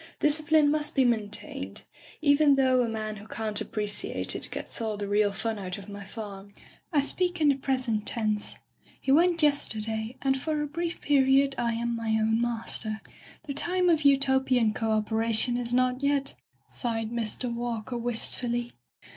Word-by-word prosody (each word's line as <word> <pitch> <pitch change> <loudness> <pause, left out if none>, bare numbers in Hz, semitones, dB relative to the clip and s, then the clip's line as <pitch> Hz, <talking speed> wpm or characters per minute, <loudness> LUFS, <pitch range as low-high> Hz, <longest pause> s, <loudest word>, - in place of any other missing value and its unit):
Discipline 300 0 +4
must 300 0 +1
be 265 -2 +4
maintained, 215 -4 -1 0.4
even 285 -1 +5
though 260 -2 +3
a 235 - 0
man 215 -1 -4
who 205 +1 -12
can't 215 -2 -3
appreciate 210 -1 -2
it - - 0
gets - - -3
all 220 -2 -2
the 205 0 -4
real 205 0 +2
fun 220 +1 -3
out 185 0 -5
of 200 0 -11
my 200 0 -8
farm. 200 -1 -8 0.4
I 295 -4 +3
speak 355 +5 0
in 300 -2 +4
the 280 - +4
present 255 -5 -1
tense. 215 -2 0 0.4
He 270 - -1
went 335 +2 +4
yesterday, 225 -5 0
and 270 -1 +2
for 310 0 -1
a 295 - -1
brief 335 +3 -4
period 275 -1 +3
I 235 -2 -1
am 235 +1 -2
my 225 -1 0
own 220 +1 +1
master. 225 -2 -2 0.4
The 280 - -5
time 360 +5 +2
of 320 -3 +3
Utopian 265 -5 +3
co 225 0 -2
operation 220 +2 +1
is 240 -1 -3
not 255 +1 +1
yet,'* 280 -1 +1 0.3
sighed 225 -2 -2
Mr. 235 +1 -2
Walker 235 0 -4
wistfully. 240 0 0
240 Hz, 165 wpm, -27 LUFS, 220-280 Hz, 0.4 s, even